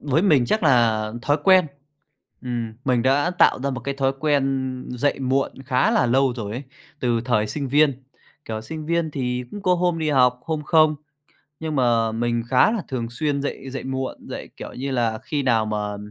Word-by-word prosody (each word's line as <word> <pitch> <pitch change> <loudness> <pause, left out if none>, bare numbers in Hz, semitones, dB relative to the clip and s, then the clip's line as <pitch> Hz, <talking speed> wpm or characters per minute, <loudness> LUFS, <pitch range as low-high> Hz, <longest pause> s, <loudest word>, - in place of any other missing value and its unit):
với 145 +3 +1
mình 150 -11 +4
chắc 215 - 0
là 115 -6 +3
thói 145 +2 +2
quen, 185 -3 +6 0.8
ừm, 120 -3 -3
mình 125 -3 +2
đã 140 +6 +2
tạo 180 - +3
ra 140 - 0
một 130 - -4
cái 140 - -3
thói 135 -1 +1
quen 135 -3 0
dậy 125 +4 0
muộn 135 +1 0
khá 125 -2 +2
là 125 - +3
lâu 130 +2 +3
rồi 105 -4 -5
ấy, 125 +5 -5 0.4
từ 120 -2 +1
thời 110 -4 +1
sinh 140 +5 -3
viên. 140 -1 +2 0.4
Kiểu, 110 -1 -4
sinh 155 +7 -7
viên 170 -1 0
thì 125 -3 -2
cũng 205 -1 -8
có 180 -2 +3
hôm 175 -1 0
đi 155 -1 0
học, 125 -3 +3
hôm 155 -2 -2
không, 155 -1 +4 0.7
nhưng 160 -2 -3
mà 115 -3 +2
mình 120 +1 -1
khá 130 - +4
là 225 -5 -2
thường 120 -3 -3
xuyên 140 +3 -1
dậy 135 -1 -5
dậy 135 - -6
muộn, 130 0 -3
dậy, - - -7
kiểu - - -8
như 135 +2 -4
là, 115 -4 0
khi 145 -2 -2
nào 115 -4 +2
mà 105 -1 -3
130 Hz, 200 wpm, -23 LUFS, 120-150 Hz, 0.8 s, quen